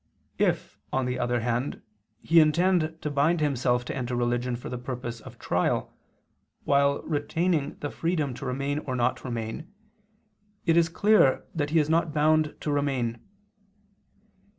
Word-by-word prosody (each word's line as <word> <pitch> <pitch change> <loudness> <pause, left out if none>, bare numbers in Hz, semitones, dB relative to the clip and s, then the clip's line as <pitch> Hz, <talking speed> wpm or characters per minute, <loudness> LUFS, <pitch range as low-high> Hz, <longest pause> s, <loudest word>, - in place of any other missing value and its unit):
If, - - 0
on 135 -1 0
the 125 0 -2
other 120 -1 0
hand, 120 +3 -2 0.4
he 165 0 +5
intend 160 +1 +3
to 150 - -2
bind 150 +4 +2
himself 125 -4 +1
to - - -4
enter 125 -2 -3
religion 120 +1 0
for 120 - -8
the 125 - -5
purpose 120 -2 -5
of - - -12
trial, - - -1 0.7
while 140 0 +2
retaining 160 +1 -1
the 145 - -3
freedom 160 -5 -1
to 135 - -8
remain 140 +3 -1
or 130 -4 -4
not 120 0 0
remain, 120 - -5 0.9
it 165 -2 +3
is 170 -1 +4
clear 200 -6 +3
that 145 -2 -1
he 160 - +1
is 150 -2 +3
not 160 -1 +1
bound 155 0 +3
to 150 - -2
remain. 135 -5 -1
140 Hz, 150 wpm, -27 LUFS, 125-155 Hz, 0.9 s, he